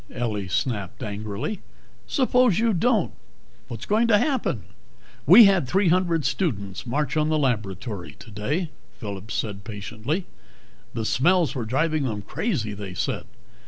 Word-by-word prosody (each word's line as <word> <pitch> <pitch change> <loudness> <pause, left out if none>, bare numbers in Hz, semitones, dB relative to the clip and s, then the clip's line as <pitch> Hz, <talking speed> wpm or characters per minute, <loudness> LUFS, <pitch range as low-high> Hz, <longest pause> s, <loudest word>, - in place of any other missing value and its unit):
Ellie 105 -5 -2
snapped 100 -1 -2
angrily. 105 - -4 0.5
"Suppose 250 - +3
you 230 -1 +2
don't 215 +1 +2 0.6
what's 120 0 -7
going 225 +3 +2
to 215 -3 +6
happen?" 225 - 0 0.6
"We 195 - +10
had 190 -8 +3
three 190 +5 +3
hundred 170 -4 +2
students 100 - -2
march 140 +2 -1
on 155 0 +2
the 155 - +2
laboratory 105 - -2
today," 130 - -3 0.3
Phillip 100 -1 -7
said 100 -3 -3
patiently. 110 - -4 0.7
"The 115 -2 -2
smells 170 +5 +3
were 125 -5 -3
driving 150 +5 +1
them 105 -5 -3
crazy, 120 - -2
they 100 -2 -7
said. - - -2
130 Hz, 135 wpm, -24 LUFS, -, 0.7 s, We